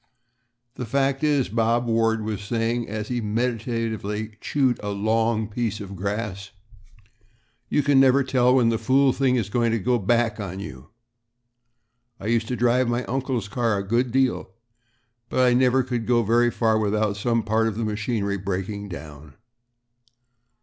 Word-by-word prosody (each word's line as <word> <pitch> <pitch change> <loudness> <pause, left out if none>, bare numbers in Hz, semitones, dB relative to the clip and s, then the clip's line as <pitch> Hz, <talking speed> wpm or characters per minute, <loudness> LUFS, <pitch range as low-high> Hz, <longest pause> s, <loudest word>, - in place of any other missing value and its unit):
"The 125 - -4
fact 135 +3 0
is," 145 -4 +2
Bob 115 +3 +1
Ward 115 -1 +1
was 105 -1 -3
saying, 115 +2 -2
as 105 0 -4
he 120 -1 -1
meditatively 110 -1 -2
chewed 130 -4 +1
a 105 - -4
long 110 +2 0
piece 110 -1 -3
of 100 -1 -8
grass, 100 0 -4 1.2
"you 150 - +2
never 135 0 +5
can 130 - -10
tell 125 -1 +4
when 120 -3 +4
the 115 -1 0
fool 130 +3 +3
thing 130 -1 +1
is 115 -6 0
going 120 0 +1
to - - +2
go 120 +3 +1
back 115 +2 +1
on 95 -2 -5
you. 65 -10 -9 1.3
I - - -9
used 115 0 +1
to 125 - -2
drive 125 +2 +2
my 120 +1 0
uncle's 130 -4 -2
car 115 0 0
a 100 0 -4
good 120 +3 +1
deal, 130 0 +1 0.8
but 130 - +2
I 125 - +4
never 130 +1 +3
could 120 -2 -3
go 120 -1 +3
very 120 +3 +3
far 110 -2 +1
without 105 0 0
some 115 +2 0
part 110 +1 +1
of 110 -2 -3
the 115 - -1
machinery 105 -1 -2
breaking 100 +2 -4
down. 75 -3 -10
115 Hz, 165 wpm, -24 LUFS, 105-125 Hz, 1.3 s, never